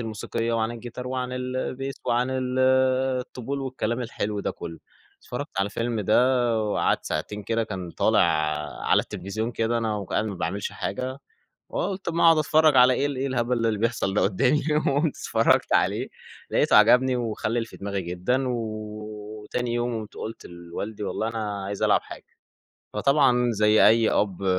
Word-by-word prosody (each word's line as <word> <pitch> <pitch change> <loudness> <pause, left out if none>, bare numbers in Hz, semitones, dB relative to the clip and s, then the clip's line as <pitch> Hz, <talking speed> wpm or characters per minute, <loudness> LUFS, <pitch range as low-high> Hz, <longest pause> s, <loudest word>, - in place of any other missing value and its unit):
الموسيقية 115 +1 -3
وعن 115 0 0
الجيتار 120 +1 -7
وعن 125 -1 -3
ال 125 0 -3
البيس 135 +1 -3
وعن 120 +2 +1
ال 130 -1 -2 0.6
الطبول 135 +2 -5
والكلام 125 -3 -2
الحلو 105 -3 -3
ده - - -2
كُلّه. 85 -1 -8 0.4
اتفرّجت - - -5
على 100 - +2
الفيلم 115 +2 -2
ده 120 +2 +3
وقعدت 105 - 0
ساعتين 105 +7 -3
كده 115 +2 0
كان 95 -5 -6
طالع - - +2 0.6
على - - +4
التليفزيون 110 +5 -4
كده، 115 +1 0
أنا 110 -2 -1
و 100 - -4
كنت - - -10
قاعد - - +1
ما 100 - -4
باعملش 95 +3 -3
حاجة، 130 +6 -4 0.5
فقُلت 190 0 -3
أمّا 170 0 +1
أقعد 165 -1 +7
أتفرّج 155 -1 +4
على 125 0 +7
إيه، 135 - 0
ال 145 -1 -2
إيه 135 - -1
الهبل 120 -2 0
اللي 105 -2 -1
بيحصل 115 -4 0
ده - - +2
قُدّامي؟ 125 +9 +2 0.3
وقُمت 145 +2 +1
اتفرّجت - - +2
عليه - - +2 0.4
لاقيته - - +3
عجبني، 125 +4 +6
وخلِّل 115 -1 -2
في - - -13
دماغي 100 -1 -3
جدًا 90 +10 -1
و 125 - 0 0.9
وتاني 120 +2 -2
يوم 120 -1 -1
قُمت 105 -1 -9
قُلت 110 +1 -7
لوالدي: 85 +5 -7
"والله 110 - -2
أنا 105 -3 -4
عايز 100 0 -4
ألعب - - +4
حاجة." - - -11 0.7
فطبعًا 125 0 +3
زي 105 0 +5
أي 110 +1 +4
أب 100 -2 0
115 Hz, 170 wpm, -25 LUFS, 105-125 Hz, 0.9 s, أقعد